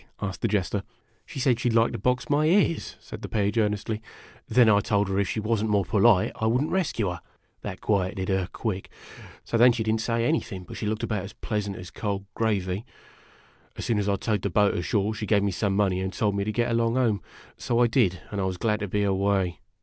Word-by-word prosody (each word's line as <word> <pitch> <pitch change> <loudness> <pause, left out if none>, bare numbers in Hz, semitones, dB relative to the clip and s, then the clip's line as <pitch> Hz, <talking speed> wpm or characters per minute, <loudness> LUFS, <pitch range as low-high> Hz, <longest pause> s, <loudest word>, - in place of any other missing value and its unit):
asked 95 -2 -4
the - - +2
Jester. 100 -2 0 0.2
" 115 -2 -40
She 155 - -7
said 125 -3 +2
she 120 - +1
'd 115 - 0
like 115 0 +4
to - - -5
box 125 +4 0
my 150 +1 +2
ears," 175 -2 +2
said - - -10
the - - -6
Page, 105 0 0
earnestly. 105 +1 -1 0.5
"Then 120 +1 +5
I 105 -2 +6
told 100 -1 +1
her 95 0 0
if 100 - 0
she - - -1
was 110 0 0
n't 110 - -1
more 100 -2 +2
polite 105 -2 +4
I 110 - 0
would 125 +5 +2
n't 155 - -3
rescue 150 - 0
her. 90 - -7 0.4
That - - -6
quieted 95 -2 0
her, 95 -2 0
quick! 100 -5 -4 0.5
So 115 - -1
then 120 +2 +7
she 115 -1 -1
did 110 0 +1
n't 110 - 0
say 115 0 0
anything, 100 - -1
but - - -10
she 105 - -3
looked 110 +1 -2
about 105 -4 -1
as 100 - -8
pleasant 105 -2 -3
as 90 -2 -9
cold 100 -2 -3
gravy. 100 -3 -1 0.9
As - - -4
soon 115 -3 +1
as 100 0 0
I 100 - +2
towed 105 +1 -1
the 100 - -1
boat 105 +2 +3
ashore, 100 +4 0
she 110 0 -5
gave 100 -1 +3
me 100 - +1
some 100 +1 0
money 95 -2 +1
and 95 0 -2
told 105 0 0
me 100 0 -1
to 110 - -1
get 120 +2 0
along 115 0 +1
home. 115 -7 +2 0.4
So 120 - -1
I 120 - +5
did, 110 - +2
and 100 -1 -2
I - - 0
was 95 -1 -2
glad 105 +2 0
to 105 - -3
be 105 +2 0
away. 95 -2 +1
105 Hz, 250 wpm, -26 LUFS, 100-115 Hz, 0.9 s, then